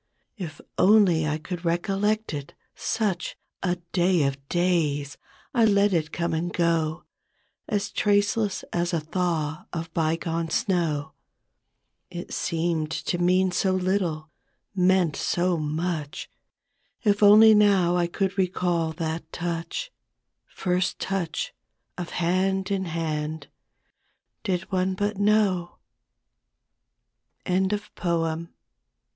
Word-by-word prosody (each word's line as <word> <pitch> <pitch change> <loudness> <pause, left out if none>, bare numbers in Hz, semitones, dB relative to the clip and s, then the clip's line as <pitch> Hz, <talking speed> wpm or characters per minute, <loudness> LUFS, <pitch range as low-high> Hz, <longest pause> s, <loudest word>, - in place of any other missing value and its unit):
If 160 -5 -6 0.2
only 185 -6 +5
I 150 0 0
could 175 +3 -6
recollect 195 +5 0
it, 145 -1 -6 0.2
such 200 -6 -2 0.2
A 180 -2 +1 0.2
day 180 -2 +3
of 140 0 -3
days! 155 -5 +1 0.4
I 240 -3 +3
let 200 -2 +4
it 160 -2 0
come 170 0 -1
and 170 +2 -1
go 165 -2 0 0.7
As 200 -1 -1
traceless 205 0 +1
as 175 0 0
a 165 - +2
thaw 155 -2 -2
of 165 0 -5
bygone 165 0 -1
snow; 160 -4 0 1.0
It 175 -1 -7
seemed 165 -2 -1
to 175 +2 -2
mean 185 +1 +3
so 190 +1 +1
little, 180 -5 -1 0.4
meant 185 -4 +3
so 175 0 0
much; 155 0 -3 0.7
If 205 -2 +2
only 215 +2 +8
now 195 -4 +4
I 175 -1 +2
could 195 +2 -2
recall 175 -3 0
that 160 0 -4
touch, 170 - -4 0.6
First 180 -1 -1
touch 180 -4 -3 0.4
of 175 -1 -5
hand 190 +3 0
in 190 -1 0
hand 160 -2 -3 0.5
— - - -48
Did 185 -5 0
one 185 0 +1
but 205 +1 -2
know 205 -4 +2 1.7
CHRISTMAS 190 +2 +1
EVE. 170 -5 -2
175 Hz, 115 wpm, -25 LUFS, 165-190 Hz, 1.7 s, only